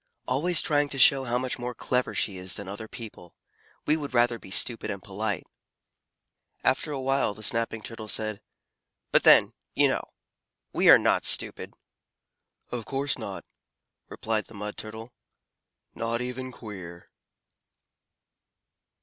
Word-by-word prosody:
"Always 160 +6 +3
trying 145 -1 +1
to 135 - -4
show 135 0 +6
how 120 0 0
much 130 0 -3
more 125 0 -4
clever 125 +2 -1
she 100 - +1
is 90 0 -4
than 100 - -7
other 105 +3 -7
people. 110 -7 -11 0.5
We 150 - +3
would 145 -4 -5
rather 120 -1 +3
be - - -13
stupid 115 +4 +2
and 100 - -4
polite." 100 0 -3 1.2
After 150 +3 +1
a 140 - -3
while 135 -5 0
the 110 - -9
Snapping 115 0 0
Turtle 115 -2 -8
said, 110 -1 0 0.7
"But - - +5
then, - - +6 0.2
you - - +5
know, - - 0 0.7
we - - +4
are - - +11
not - - +2
stupid." - - +1 1.0
"Of 120 -2 -3
course 135 +1 -1
not," - - -7 0.6
replied 110 -1 -2
the 110 - -15
Mud 105 +1 -5
Turtle, 110 +2 -9 0.8
"not 115 +1 -2
even 125 +1 -5
queer." 95 -8 -10
115 Hz, 140 wpm, -27 LUFS, 105-130 Hz, 1.2 s, are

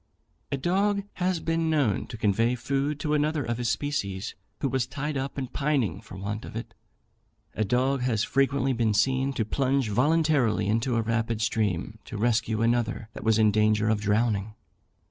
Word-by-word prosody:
A 140 - 0
dog 200 +7 +1 0.2
has 180 -1 +1
been 165 0 0
known 145 -10 +1
to 115 - -7
convey 115 +3 +2
food 140 +4 -1
to 150 - 0
another 150 -1 +1
of 120 +1 -2
his 120 -2 0
species 105 -6 -2 0.3
who 140 - 0
was 130 -2 0
tied 145 +3 -4
up 135 +1 -3
and 130 -2 -4
pining 130 - 0
for 100 - -11
want 105 +3 -4
of - - -9
it. 115 - -6 0.8
A 110 - 0
dog 130 +5 +1
has 115 -4 +1
frequently 135 0 +1
been 115 -3 +1
seen 130 +5 +2
to 115 -4 -1
plunge 135 +1 0
voluntarily 135 -3 +2
into 115 +4 +1
a 115 - +1
rapid 115 0 -1
stream, 105 -2 -1
to 115 - -6
rescue 110 0 +1
another 115 -2 0
that - - -8
was 110 -1 +3
in 110 -1 +4
danger 105 0 +2
of 110 -1 +1
drowning. 105 0 0
120 Hz, 180 wpm, -27 LUFS, 110-140 Hz, 0.8 s, in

